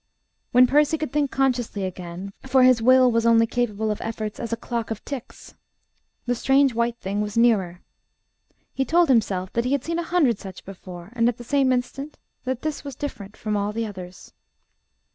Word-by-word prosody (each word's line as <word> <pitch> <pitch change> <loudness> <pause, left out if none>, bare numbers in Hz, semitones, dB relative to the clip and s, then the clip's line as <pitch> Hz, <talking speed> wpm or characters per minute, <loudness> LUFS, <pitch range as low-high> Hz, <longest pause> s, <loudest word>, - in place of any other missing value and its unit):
When 250 +1 +7
Percy 295 +4 +3
could 310 -1 -4
think 290 -1 +1
consciously 245 -7 0
again 185 +1 -6
for 260 0 +4
his 255 -2 +5
will 255 +1 +6
was 230 0 +1
only 230 0 +5
capable 220 -3 -1
of 210 - -4
efforts 220 -1 -4
as 235 -2 -5
a 230 - -1
clock 230 -1 -4
of 225 -1 -6
ticks 275 -5 -8 0.7
the 245 - +1
strange 270 +2 +3
white 235 +1 0
thing 200 0 -3
was 210 +1 -4
nearer. 195 -7 +2 0.9
He 270 - 0
told 335 +3 +3
himself 195 -7 +1
that 235 - +1
he 250 +3 0
had 280 - 0
seen 335 +1 -2
a - - 0
hundred 325 - +2
such 190 -1 -10
before; 185 -1 -10
and 235 -1 +3
at 245 - -4
the 240 - -9
same 270 +1 +2
instant 265 +4 -3 0.3
that 255 -1 -3
this 310 -1 -3
was 280 -3 -7
different 205 -8 -7
from 215 -1 -2
all 205 +1 -2
others. 185 -5 -6
235 Hz, 190 wpm, -24 LUFS, 210-265 Hz, 0.9 s, When